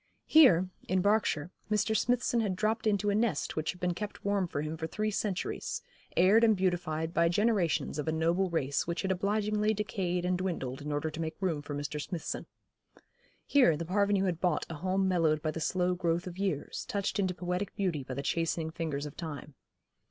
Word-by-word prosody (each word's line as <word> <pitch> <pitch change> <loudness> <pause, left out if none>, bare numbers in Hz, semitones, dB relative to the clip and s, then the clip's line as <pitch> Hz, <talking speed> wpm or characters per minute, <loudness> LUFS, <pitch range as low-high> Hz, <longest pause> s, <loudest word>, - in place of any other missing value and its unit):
Here, 190 - +6 0.2
in 185 0 +2
Berkshire, 200 -6 +1 0.2
Mr. 215 +1 +1
Smithson 245 0 +2
had 205 -5 0
dropped 220 +3 0
into 205 0 +2
a - - +1
nest 210 -7 0
which 155 0 -1
had 180 - -15
been 180 0 0
kept 210 +3 -6
warm 200 -2 +1
for 145 -3 -3
him 155 +1 -3
for 160 0 -4
three 215 +4 -2
centuries, 200 -2 -2 0.3
aired 195 +6 +6
and 220 -3 +5
beautified 170 -3 -1
by 170 -1 +3
generations 185 -6 +1
of 150 - -3
a - - +2
noble 170 +4 +1
race 140 -4 0
which 170 +2 -2
had 190 - 0
obligingly 210 +3 +1
decayed 185 -4 -1
and 180 0 +1
dwindled 140 -9 -3
in 150 +1 -4
order 145 +2 -1
to 160 +2 -5
make 160 0 -4
room 175 -6 0
for 145 0 -6
Mr. 145 +1 -3
Smithson. 170 +1 -5 1.0
Here 250 - +4
the 170 - -4
Parvenu 200 +2 +2
had 175 -3 -1
bought 175 -5 +1
a - - -3
home 185 +4 0
mellowed 165 -4 +2
by 155 - 0
the 165 - -5
slow 180 +2 +1
growth 175 -1 0
of 180 0 -7
years, 185 -8 -2
touched 200 0 -1
into 185 -2 0
poetic 180 +2 -3
beauty 175 -8 -1
by 130 0 -6
the 140 - -3
chastening 165 +1 -1
fingers 155 -4 -3
of 145 - -8
time. 150 -3 -7
180 Hz, 200 wpm, -31 LUFS, 160-200 Hz, 1.0 s, Here